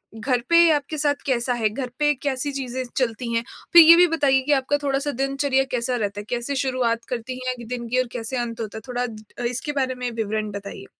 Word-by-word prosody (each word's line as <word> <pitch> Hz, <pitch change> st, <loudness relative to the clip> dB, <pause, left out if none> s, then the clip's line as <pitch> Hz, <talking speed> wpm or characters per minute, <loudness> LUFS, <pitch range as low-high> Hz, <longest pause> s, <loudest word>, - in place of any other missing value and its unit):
घर 245 Hz, +3 st, 0 dB
पे 340 Hz, 0 st, +6 dB
आपके 295 Hz, +1 st, -1 dB
साथ 290 Hz, -1 st, +2 dB
कैसा 245 Hz, -2 st, 0 dB
है, 225 Hz, -3 st, +1 dB
घर 250 Hz, +4 st, -5 dB
पे 295 Hz, 0 st, +3 dB
कैसी 280 Hz, 0 st, -1 dB
चीज़ें 260 Hz, -2 st, -4 dB
चलती 235 Hz, -1 st, -1 dB
हैं? 230 Hz, 0 st, +1 dB, 0.3 s
फिर 340 Hz, -, +11 dB
ये 330 Hz, +1 st, +9 dB
भी 355 Hz, +1 st, +6 dB
बताइए 280 Hz, -5 st, +2 dB
कि 295 Hz, -, 0 dB
आपका 270 Hz, +1 st, +1 dB
थोड़ा 275 Hz, -1 st, +1 dB
सा 290 Hz, +1 st, -2 dB
दिनचर्या 275 Hz, 0 st, 0 dB
कैसा 250 Hz, 0 st, -1 dB
रहता 205 Hz, -3 st, -2 dB
है? -, -, -6 dB
कैसे 245 Hz, +3 st, -2 dB
शुरुआत 255 Hz, -3 st, 0 dB
करती 250 Hz, +1 st, -4 dB
हैं 255 Hz, -, 0 dB
दिन 240 Hz, 0 st, -5 dB
की 250 Hz, +2 st, +1 dB
और 255 Hz, -, -4 dB
कैसे 245 Hz, +2 st, -3 dB
अंत 235 Hz, -1 st, -3 dB
होता 220 Hz, -1 st, -5 dB
है? 220 Hz, -, -7 dB
थोड़ा 245 Hz, 0 st, -2 dB
द 215 Hz, -3 st, -9 dB, 0.2 s
इसके 250 Hz, +4 st, -3 dB
बारे 260 Hz, 0 st, -1 dB
में 250 Hz, -1 st, -3 dB
विवरण 215 Hz, -1 st, -2 dB
बताइए। 200 Hz, -8 st, -8 dB
255 Hz, 230 wpm, -23 LUFS, 235-275 Hz, 0.3 s, फिर